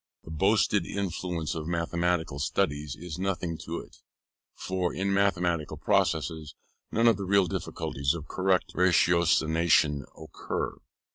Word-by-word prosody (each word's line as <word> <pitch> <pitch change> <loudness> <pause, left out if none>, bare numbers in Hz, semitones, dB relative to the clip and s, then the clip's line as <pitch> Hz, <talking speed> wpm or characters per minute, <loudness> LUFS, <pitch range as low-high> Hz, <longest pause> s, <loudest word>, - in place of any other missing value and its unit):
The - - -10
boasted 100 +3 +2
influence 90 -4 -3
of 80 -1 -5
mathematical 85 -3 -1
studies 75 -1 -1
is 85 0 -7
nothing 90 -3 -2
to - - -4
it; - - -17 0.6
for 90 -1 -2
in 100 +1 -1
mathematical 90 -5 +1
processes, 80 -1 0 0.4
none 115 +2 +3
of 115 -4 +5
the 100 - -4
real 100 0 +4
difficulties 70 -3 -2
of 80 -2 -7
correct 95 0 +1
ratiocination 85 -4 +3
occur. 80 - -4
85 Hz, 125 wpm, -28 LUFS, 80-95 Hz, 0.6 s, of